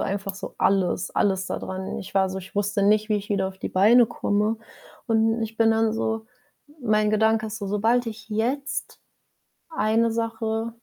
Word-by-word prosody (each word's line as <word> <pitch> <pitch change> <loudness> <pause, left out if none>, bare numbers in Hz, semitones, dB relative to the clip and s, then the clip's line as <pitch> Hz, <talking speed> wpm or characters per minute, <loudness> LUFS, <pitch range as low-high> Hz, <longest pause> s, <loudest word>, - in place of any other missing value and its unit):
einfach 195 0 -3
so 195 - -8
alles 190 -2 +1
alles 190 -2 +1
da - - -3
dran. 190 0 -5
Ich 190 - -9
war 190 -1 +3
so 190 - -4
ich 190 0 -12
wusste 205 0 0
nicht, 215 +2 +3
wie 215 - +2
ich 205 0 -6
wieder 195 -2 0
auf 190 0 -12
die - - -4
Beine 225 +6 +5
komme. 215 -1 0 0.5
Und 225 0 +2
ich 225 0 -5
bin 225 0 +4
dann 225 0 +2
so 225 0 -2 0.6
mein 215 -2 +2
Gedanke 220 +1 +2
ist 220 0 -6
so: 200 - -5
„Sobald 225 +5 +2
ich 220 0 -7
jetzt 245 +7 -2 0.7
eine 230 -5 +1
Sache“ 225 0 -2
215 Hz, 185 wpm, -24 LUFS, 200-225 Hz, 0.7 s, Beine